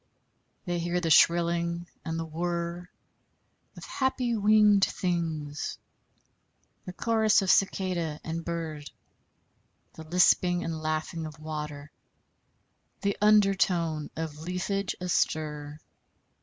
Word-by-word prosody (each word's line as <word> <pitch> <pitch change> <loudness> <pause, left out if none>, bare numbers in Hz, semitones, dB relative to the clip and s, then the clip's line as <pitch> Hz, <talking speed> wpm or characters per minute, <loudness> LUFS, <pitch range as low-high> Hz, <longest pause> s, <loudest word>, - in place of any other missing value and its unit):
They 175 -2 -1
hear 175 +1 -1
the 165 -2 -1
shrilling 170 +1 +3 0.2
and 165 -1 -3
the 165 - -3
whirr 170 +2 -3 0.9
of - - -10
happy 255 -3 -1
winged 210 -1 +5
things, 160 -6 -2 1.1
the 180 - -5
chorus 220 0 +2
of 190 - +3
cicada 180 -5 0
and 165 +1 -4
bird, 160 -3 -5 1.0
the 160 - -10
lisping 180 +1 +3
and 160 -1 -4
laughing 155 +1 -3
of 155 0 -11
water, 150 -1 -6 1.1
the 200 -1 0
under 210 -2 +5
tone 165 -5 0
of 155 -2 -5
leafage 180 +3 -2
astir. 150 -4 -1
170 Hz, 105 wpm, -28 LUFS, 155-185 Hz, 1.1 s, winged